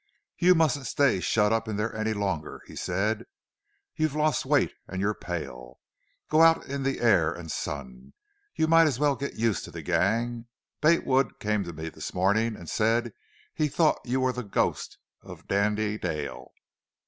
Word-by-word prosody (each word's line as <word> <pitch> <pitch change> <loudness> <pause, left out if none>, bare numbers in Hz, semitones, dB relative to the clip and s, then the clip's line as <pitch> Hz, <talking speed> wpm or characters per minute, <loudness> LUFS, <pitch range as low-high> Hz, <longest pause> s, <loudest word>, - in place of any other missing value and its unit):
"You 180 +1 +6
mustn't 145 -5 +1
stay 140 -9 +2
shut 105 +3 +2
up 115 0 0
in 110 - -3
there 110 +1 -2
any 110 0 -1
longer," 95 -7 -3
he - - -12
said. 105 +2 -1 0.7
"You've 155 -2 0
lost 155 0 +1
weight - - +2
and 95 - -5
you're 100 +2 +1
pale. 70 -11 -7 0.5
Go 155 +1 +3
out 165 0 +5
in 140 0 -4
the 135 0 -1
air 95 -9 +4
and 85 -2 -7
sun. 65 -2 -6 0.4
You 160 - +2
might 165 0 +6
as 135 -6 -1
well 145 0 +2
get 140 +1 -5
used 115 -2 0
to - - -11
the - - -8
gang. 115 +3 0 0.3
Bate 165 +2 +4
Wood 130 0 +1
came 105 -1 0
to 85 - -6
me 80 +1 -6
this - - -8
morning 105 +5 +2
and 85 - -11
said 115 +3 +1 0.4
he 155 - +1
thought 155 +2 +2
you 130 +1 -1
were 130 -1 +1
the 125 - -4
ghost 100 - -1 0.2
of - - -12
Dandy 105 +1 0
Dale. 75 -5 -4
110 Hz, 180 wpm, -27 LUFS, 95-135 Hz, 0.7 s, You